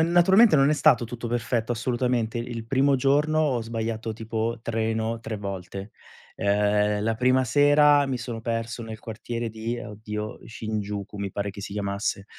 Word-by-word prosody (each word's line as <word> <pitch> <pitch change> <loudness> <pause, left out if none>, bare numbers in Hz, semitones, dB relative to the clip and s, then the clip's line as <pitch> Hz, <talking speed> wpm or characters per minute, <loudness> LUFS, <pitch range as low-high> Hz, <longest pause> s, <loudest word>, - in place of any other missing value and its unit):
n 165 +1 +2
naturalmente 190 +2 +6
non 135 +1 +4
è - - +4
stato 125 -5 +4
tutto 120 0 -6
perfetto, 115 0 -1
assolutamente, 120 -1 -1
il 115 -1 -5
primo 135 +2 +3
giorno 150 +4 +2
ho 135 -6 +1
sbagliato, 115 -1 -3
tipo, 115 +1 -3
treno 115 0 -1
3 110 -1 -5
volte. 100 0 -6 0.5
Ehm, 105 +1 +2
la 115 +1 +1
prima 130 +3 +3
sera 145 +3 +5
mi 135 -1 -1
sono 120 -2 -5
perso 115 +1 -3
nel 110 -1 -7
quartiere 115 +1 -5
di 115 +2 -4
oddio, 105 0 -6
Shinjuku, 105 -2 -5
mi 100 -1 -3
pare 100 +1 -3
che 100 - -10
si 100 - -7
chiamasse, 100 -1 -2
115 Hz, 165 wpm, -25 LUFS, 105-125 Hz, 0.5 s, naturalmente